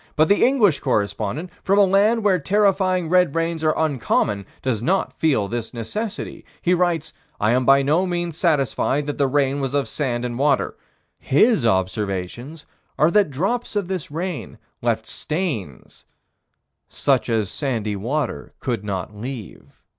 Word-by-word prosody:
But 155 +1 +3
the 200 - +4
English 230 - +4
correspondent, 110 - -1
from 195 +1 +2
a 205 - +7
land 205 +4 +3
where 190 -3 +3
terrifying 185 0 +2
red 180 -3 +3
rains 165 -1 -1
are 155 0 +2
uncommon, 115 -9 0 0.2
does 120 -5 -1
not 185 +10 0
feel 135 -11 +1
this 115 +2 -5
necessity. 210 - -5 0.2
He 180 - +2
writes: 170 -3 0 0.3
"I 105 +1 +2
am 125 +1 +2
by 135 +1 +5
no 160 +7 +2
means 175 -2 -2
satisfied 145 -3 +1
that 145 0 -4
the 140 - +3
rain 140 0 +1
was 135 0 -2
of 140 - +1
sand 125 -4 -2
and 120 0 -4
water." 140 -1 +1 0.4
His 150 - +3
observations 100 - -2 0.3
are 155 +2 +4
that 205 -4 +4
drops 200 - -2
of 200 -3 -1
this 185 -5 -3
rain 170 +2 -5 0.2
left - - 0
stains 140 - -4 0.8
"such 130 -4 +1
as 110 -3 0
sandy 110 -4 -2
water 130 +10 -3
could 120 -5 -2
not 100 0 -4
leave." 115 -2 -9
145 Hz, 155 wpm, -22 LUFS, 120-180 Hz, 0.8 s, a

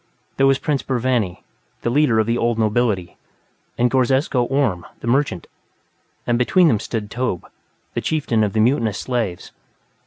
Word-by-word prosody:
There 135 - +4
was 135 -1 +4
Prince 145 -1 -1
Burvanny, 120 -7 -1 0.4
the 120 - 0
leader 140 -4 +3
of 110 - +3
the 115 +2 0
old 120 -1 0
nobility, 110 -4 0 0.6
and 120 0 +2
Ghorzesko 130 0 +2
Orhm, 125 -11 0 0.2
the - - -9
merchant, 120 - 0 0.8
and 120 0 +1
between 170 +7 +4
them 110 - +2
stood 105 -2 -4
Tobbh, 120 -8 -2 0.5
the - - -2
chieftain 130 -8 0
of 100 -2 -1
the 110 - 0
mutinous 115 -4 +1
slaves. 115 -8 -3
120 Hz, 155 wpm, -20 LUFS, 110-135 Hz, 0.8 s, There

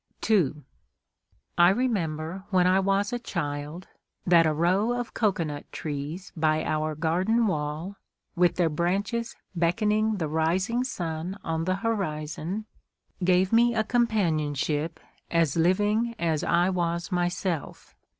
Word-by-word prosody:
II 160 -9 +2 1.0
I 175 0 +8
remember, 185 -6 -1
when 185 -3 +3
I 185 +1 +4
was 195 +3 +1
a 240 - -1
child, 150 -3 -4 0.4
that 170 -2 +5
a - - +2
row 185 +9 +2
of 245 -1 -4
cocoanut 165 -9 -1
trees 150 +5 -5
by 155 -1 +1
our 155 0 -1
garden 185 +9 +1
wall, 155 +2 -3 0.4
with 175 0 +3
their 175 -2 +2
branches 195 +9 -1 0.2
beckoning 210 +5 +1
the 165 -4 -1
rising 180 +10 0
sun 175 -5 -4
on 165 0 -2
the 185 +1 +1
horizon, 180 -1 -2 0.6
gave 185 +2 +3
me 235 +1 +4
a 220 - +2
companionship 160 - 0 0.3
as 165 -4 +2
living 205 +7 +2
as 160 -4 0
I 175 +2 +2
was 170 0 -2
myself. 175 -2 -2
175 Hz, 125 wpm, -26 LUFS, 160-205 Hz, 1.0 s, I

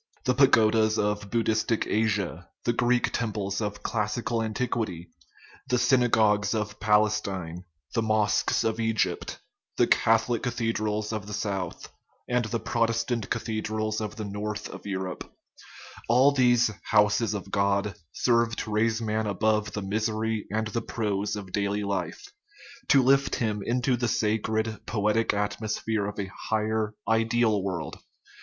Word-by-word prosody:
The 125 - +3
pagodas 110 -4 +4
of 105 -1 -1
Buddhistic 115 0 +1
Asia, 100 -6 -1
the 120 - +1
Greek 120 +1 +2
temples 105 -3 -2
of 105 -1 -4
classical 115 +2 -1
antiquity, 110 -6 -2 0.6
the 125 - +2
synagogues 115 -4 +3
of 105 -1 -3
Palestine, 100 -5 +1 0.3
the 115 - +1
mosques 110 -1 +2
of 110 0 -1
Egypt, 110 -6 -1 0.4
the - - +5
Catholic 115 +1 +2
cathe 115 -2 -1
drals 105 0 -2
of 105 -2 -4
the 105 - -6
south, 95 -5 -4 0.3
and 125 -1 +1
the 115 +1 -2
Protestant 115 -1 -1
cathedrals 110 -1 -2
of 105 0 -4
the 110 -2 -5
north, 105 +1 -4
of - - -9
Europe 95 -2 -4 0.8
all 130 +4 +6
these 120 -4 +3
" - - -39
houses 105 +1 +3
of 95 -1 -6
God 100 0 +1
" 80 - -50
serve 115 -1 +2
to 110 - -5
raise 110 +2 +1
man 110 0 -1
above 105 +1 0
the 105 - -3
misery 110 +2 -1
and 110 +1 0
the 115 +2 -2
prose 105 -3 -2
of 95 -3 -7
daily 100 +1 -1
life, 100 - -4 0.5
to 135 -2 +5
lift 135 +2 +3
him 105 -3 -1
into 125 +2 +1
the 120 0 -1
sacred, 110 0 0
poetic 105 +1 +1
atmosphere 105 0 -1
of 105 - -6
a 100 - -1 0.2
high 110 -1 +2
er, 110 0 -1
ideal 110 -1 +2
world. 90 -6 -4
110 Hz, 145 wpm, -27 LUFS, 105-115 Hz, 0.8 s, all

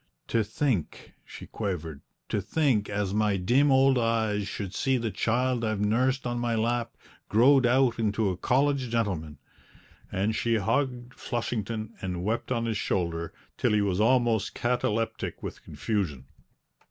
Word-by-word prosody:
"To 115 -1 +2
think," 110 - -2
she - - -10
quavered, 85 -8 -4 0.3
"to 105 - 0
think 125 - +1
as 100 -1 -1
my 105 -1 +2
dim 125 +10 +3
old 135 -1 +5
eyes 110 -3 0
should 100 -3 -5
see 135 +4 +1
the 115 -2 -2
child 125 +2 0
I've 110 -2 -1
nursed 125 +6 +1
on 120 0 -2
my 120 -1 0
lap 115 +1 -1 0.3
growed 130 +4 +5
out 125 -1 +3
into 105 -1 +1
a - - -3
college 135 +5 +1
gentleman!" 95 -10 -2 0.7
And 100 +4 0
she 115 0 +1
hugged 120 +3 -1
Flushington 115 -2 -3
and 90 -2 -3
wept 115 +5 -2
on 115 -2 0
his 110 -2 -1
shoulder 85 -4 -2 0.3
till - - +2
he 105 - +3
was 100 -1 0
almost 115 -3 +2
cataleptic 115 -2 -1
with - - -6
confusion. 85 - -3
115 Hz, 150 wpm, -27 LUFS, 100-120 Hz, 0.7 s, old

